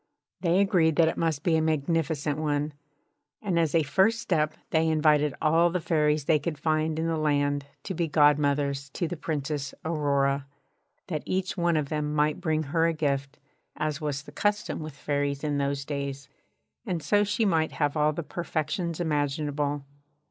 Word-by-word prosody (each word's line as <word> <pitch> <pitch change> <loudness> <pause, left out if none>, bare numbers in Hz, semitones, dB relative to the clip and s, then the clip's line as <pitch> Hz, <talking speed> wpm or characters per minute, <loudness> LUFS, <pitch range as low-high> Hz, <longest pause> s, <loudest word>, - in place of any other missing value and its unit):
They 175 +1 +2
agreed 170 -5 +3
that 165 -1 +5
it - - -3
must 160 -4 -1
be 170 - +3
a 160 - +3
magnificent 155 -1 0
one; 150 -1 -1 0.7
and 185 -5 0
as 165 -1 +1
a 165 - +4
first 190 +10 +3
step 155 -8 0 0.2
they 160 0 +3
invited 150 -2 +3
all 165 +2 +4
the 180 +1 -1
Fairies 155 -3 +1
they 155 -1 +3
could 150 +1 -3
find 155 0 0
in 160 - -1
the 165 -1 0
land 145 -2 +1 0.2
to 190 - -4
be 170 -1 -1
godmothers 145 -2 +2
to 170 - -1
the 175 - -4
Princess 150 -3 -3
Aurora, 140 -3 +1 0.6
that 155 -6 -3
each 190 +2 -1
one 170 -3 +1
of 145 -2 -1
them 150 -1 -2
might 150 0 +1
bring 155 -1 0
her 165 +3 +1
a 165 - +1
gift, 140 -2 -2 0.4
as 155 0 -2
was 145 -2 -2
the - - -12
[Pg 205 - +2
3]custom 210 - -6
with 155 -3 -7
Fairies 145 0 -2
in 145 -2 0
those 140 0 -1
days, 140 -2 -4 0.6
and 170 -4 -3
so 205 0 +3
she 210 +2 0
might 160 -5 +1
have 145 -1 0
all 150 0 +3
the 165 +3 -4
perfections 170 +1 -3
imaginable. 145 -2 -1
155 Hz, 180 wpm, -27 LUFS, 145-165 Hz, 0.7 s, that